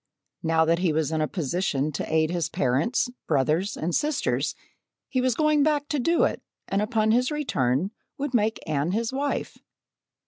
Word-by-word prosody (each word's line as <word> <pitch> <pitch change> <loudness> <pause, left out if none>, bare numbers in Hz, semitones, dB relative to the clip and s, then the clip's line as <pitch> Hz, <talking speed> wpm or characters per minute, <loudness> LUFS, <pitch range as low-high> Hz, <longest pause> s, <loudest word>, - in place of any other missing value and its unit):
Now 160 0 +3
that 165 +1 +2
he 180 -3 +2
was 155 -1 0
in 160 -1 0
a 155 - +1
position 155 -3 -1
to 150 - -4
aid 160 0 +2
his 170 -3 -1
parents, 135 - +1 0.2
brothers, 155 +7 +1
and 165 +2 -2
sisters, 300 - 0 0.5
he 255 - 0
was 255 -2 +1
going 305 0 +3
back 295 -1 +2
to 295 - 0
do 335 +7 +2
it - - 0 0.3
and 195 +1 0
upon 215 0 +1
his 250 +3 +3
return 180 - 0 0.3
would 280 -1 -3
make 220 -2 +2
Anne 155 +3 0
his 230 +3 -1
wife. 280 +1 -2
190 Hz, 175 wpm, -26 LUFS, 155-255 Hz, 0.5 s, Now